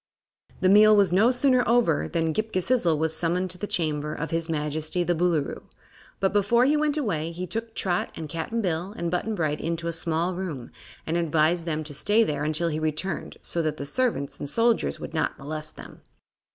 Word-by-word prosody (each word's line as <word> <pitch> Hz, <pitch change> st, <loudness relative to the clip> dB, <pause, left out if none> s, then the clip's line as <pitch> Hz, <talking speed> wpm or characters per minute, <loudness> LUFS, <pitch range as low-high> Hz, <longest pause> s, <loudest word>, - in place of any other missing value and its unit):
The 185 Hz, -, +4 dB
meal 215 Hz, +2 st, +7 dB
was 200 Hz, -4 st, +4 dB
no 210 Hz, +6 st, +5 dB
sooner 255 Hz, 0 st, +3 dB
over 230 Hz, -11 st, +3 dB
than 165 Hz, -1 st, 0 dB
Ghip 220 Hz, +6 st, -2 dB
Ghisizzle 185 Hz, -3 st, +2 dB
was 160 Hz, +1 st, 0 dB
summoned 180 Hz, +3 st, 0 dB
to 180 Hz, -, -9 dB
the 205 Hz, -, -3 dB
chamber 150 Hz, -4 st, -1 dB
of 165 Hz, -, -4 dB
his 165 Hz, 0 st, -1 dB
Majesty 155 Hz, +2 st, -1 dB
the 175 Hz, -, +1 dB
Boolooroo, 170 Hz, -3 st, -1 dB, 0.5 s
but 195 Hz, 0 st, +1 dB
before 210 Hz, +4 st, +3 dB
he 290 Hz, +3 st, +3 dB
went 300 Hz, 0 st, +1 dB
away 165 Hz, -, -1 dB
he 175 Hz, +2 st, -5 dB
took 225 Hz, +5 st, -5 dB
Trot 180 Hz, -3 st, -1 dB
and 160 Hz, -, -6 dB
Cap'n 165 Hz, +9 st, -3 dB
Bill 180 Hz, 0 st, -2 dB
and 170 Hz, -1 st, -2 dB
Button 210 Hz, +5 st, -1 dB
Bright 155 Hz, -5 st, -1 dB
into 170 Hz, +1 st, -2 dB
a 170 Hz, -, -1 dB
small 165 Hz, +2 st, -1 dB
room 170 Hz, -10 st, -5 dB, 0.3 s
and 165 Hz, +2 st, -1 dB
advised 165 Hz, +1 st, +1 dB
them 155 Hz, -1 st, -1 dB
to 150 Hz, -1 st, -9 dB
stay 205 Hz, +10 st, +3 dB
there 145 Hz, -6 st, -2 dB
until 155 Hz, +3 st, 0 dB
he 155 Hz, -1 st, -2 dB
returned, 155 Hz, +3 st, -3 dB
so 170 Hz, -, -1 dB
that 155 Hz, -1 st, -2 dB
the 140 Hz, -, -5 dB
servants 225 Hz, -, -1 dB
and 145 Hz, -, -4 dB
soldiers 230 Hz, +7 st, +1 dB
would -, -, -7 dB
not 155 Hz, -, -1 dB
molest 155 Hz, +2 st, -6 dB
them. -, -, -12 dB
170 Hz, 205 wpm, -26 LUFS, 155-205 Hz, 0.5 s, meal